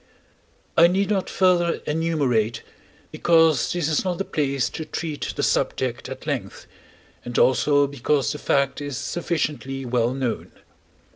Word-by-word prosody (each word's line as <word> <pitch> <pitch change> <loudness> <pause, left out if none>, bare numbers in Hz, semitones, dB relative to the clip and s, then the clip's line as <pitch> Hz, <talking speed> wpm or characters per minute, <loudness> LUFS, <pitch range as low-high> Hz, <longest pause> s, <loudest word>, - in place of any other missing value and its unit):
I 170 +1 +7
need 195 +3 0
not 195 -3 0
further 175 -2 +3
enumerate, 140 -9 0 0.5
because 165 -5 +3
this 175 -4 -1
is 155 -2 +1
not 180 -2 -1
the 195 - -2
place 140 -3 0
to 160 - -5
treat 155 -1 -4
the - - -2
subject - - -1
at - - -8
length, - - -4 0.6
and 120 -1 -5
also 145 +2 +4
because 140 0 0
the 150 - -5
fact 140 0 +1
is 145 -3 -4
sufficiently 145 -7 -3
well 120 0 0
known. 130 -4 -3
150 Hz, 140 wpm, -23 LUFS, 130-170 Hz, 0.6 s, I